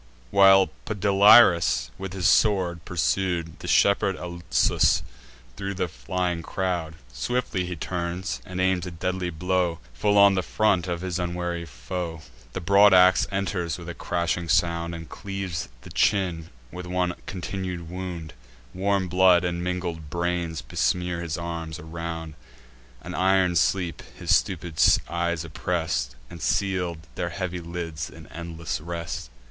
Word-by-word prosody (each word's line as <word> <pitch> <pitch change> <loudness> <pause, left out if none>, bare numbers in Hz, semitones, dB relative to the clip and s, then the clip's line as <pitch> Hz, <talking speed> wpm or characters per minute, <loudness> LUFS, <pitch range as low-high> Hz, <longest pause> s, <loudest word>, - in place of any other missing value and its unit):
While 95 -1 +6 0.2
Podalirius, 100 - +5
with 95 -1 -5
his 95 -2 -3
sword, 90 -5 +3
pursued 85 -1 -1
The - - -8
shepherd 100 -1 +3
Alsus 85 -1 +1 0.5
thro' 100 0 -4
the 90 - -1
flying 90 +1 -2
crowd, 85 -2 -2 0.2
Swiftly 95 - -1
he 90 - -4
turns, 85 -6 -3
and 90 +5 -6
aims 95 -1 +1
a - - -3
deadly 90 +1 -2
blow 90 0 0 0.2
Full 105 +10 +1
on 100 0 +7
the 95 - +1
front 95 -3 +1
of 85 -1 -3
his 95 -1 -3
unwary 85 -1 -3
foe. 80 +5 -5 0.3
The - - -3
broad 100 +2 +6
ax 90 0 +6
enters 95 -4 -2
with 85 -1 -10
a - - -4
crashing 85 0 -2
sound, 85 -1 +1
And 80 -1 -8
cleaves 95 -4 -5
the - - -12
chin 90 -5 +1 0.2
with 90 0 -7
one 90 0 0
continued 90 -2 -5
wound; 90 -2 -6 0.4
Warm 95 0 0
blood, 90 0 +5
and 85 0 -2
mingled 90 -4 -3
brains, 85 -1 -2
besmear 90 -1 -1
his 80 -2 -3
arms 85 -1 -5
around 80 -1 -6 0.7
An 90 - -7
iron 95 -1 +3
sleep 85 0 +1 0.2
his - - +3
stupid 85 -3 -1 0.3
eyes 85 -1 -1
oppress'd, 75 -6 -2
And 85 +6 -11
seal'd 90 -4 -1
their 85 - -3
heavy 90 0 -4
lids 85 -2 -5
in 80 0 -13
endless 85 -2 -5
rest. 85 -6 -5
90 Hz, 140 wpm, -25 LUFS, 85-95 Hz, 0.7 s, on